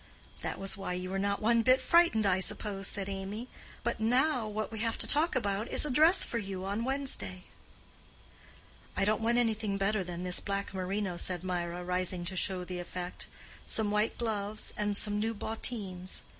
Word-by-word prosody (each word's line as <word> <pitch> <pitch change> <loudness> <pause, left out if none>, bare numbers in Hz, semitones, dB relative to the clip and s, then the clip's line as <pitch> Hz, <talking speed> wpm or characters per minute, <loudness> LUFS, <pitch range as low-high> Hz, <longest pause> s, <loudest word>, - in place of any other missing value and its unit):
"That - - -3
was 195 +1 -3
why 195 -3 -4
you 180 +1 -4
were 195 - -1
not 200 +2 -1
one 230 +1 +4
bit 255 +3 +5
frightened, 335 -11 +4
I 190 -1 +3
suppose," 195 0 -1
said 195 -2 0
Amy. 200 +4 -5 0.4
"But 235 - -1
now, 250 +2 +2
what 215 +1 -3
we 220 - -5
have 230 +1 -1
to - - +1
talk 310 +2 +4
about 210 -2 -1
is - - +6
a 295 - -2
dress 320 +8 +7
for 235 - -1
you 195 -3 -5
on 200 +4 -2
Wednesday." 255 - -2 1.5
"I 195 - +2
don't 215 +2 +1
want 235 +2 +2
anything 220 -4 +1
better 200 +1 +1
than 175 0 -6
this 180 -1 +3
black 200 0 -3
merino," 190 0 -2
said 180 -1 -1
Mirah, 175 -1 -3
rising 180 0 -1
to 185 +2 -5
show 185 0 +1
the 180 0 -5
effect. 175 0 -6 0.4
"Some 215 -2 +1
white 210 +1 +1
gloves 215 -2 -2
and 205 -1 -1
some 205 0 +1
new 225 +1 -1
bottines." 200 -4 -3
205 Hz, 185 wpm, -31 LUFS, 185-225 Hz, 1.5 s, dress